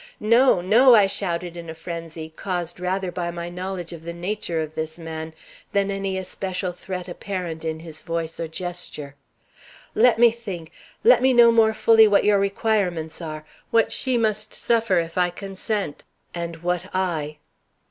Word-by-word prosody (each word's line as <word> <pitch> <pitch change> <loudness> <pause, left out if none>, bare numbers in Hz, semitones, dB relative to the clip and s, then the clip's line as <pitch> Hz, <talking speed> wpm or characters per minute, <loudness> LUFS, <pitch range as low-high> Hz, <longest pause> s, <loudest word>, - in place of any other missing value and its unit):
"No, 230 -2 +4
no!" 235 +7 +6
I 210 -3 +6
shouted 180 -3 -3
in 170 -1 -8
a 160 - -6
frenzy, 160 -1 -7
caused 175 -2 -4
rather 185 0 -1
by 175 -1 -3
my 170 0 -5
knowledge 180 -1 -5
of 165 - -9
the 170 +1 -7
nature 175 -1 -3
of 155 -1 -4
this 160 +1 -4
man 160 -1 -6 0.4
than 200 0 +1
any 195 -1 -2
especial 185 0 -3
threat 180 0 -6
apparent 175 -3 -5
in 160 0 -3
his 160 -2 -9
voice 165 -1 -4
or 165 - -2
gesture. 160 -4 -5 0.8
"Let 240 +1 +5
me 235 0 +6
think; 195 -8 -7 0.3
let - - +6
me 260 0 +4
know 235 -1 +8
more 220 -1 +4
fully 225 -1 +6
what 205 -1 +4
your 205 -1 +4
requirements 195 -5 -1
are 155 -2 -6 0.2
what 230 -1 +3
she 260 -2 +1
must 215 -1 0
suffer 230 -5 +2
if 165 +1 -1
I 180 0 +3
consent 195 -1 -4 0.3
and 170 -1 -5
what 180 +1 -1
I." 160 -5 -1
180 Hz, 170 wpm, -23 LUFS, 165-205 Hz, 0.8 s, know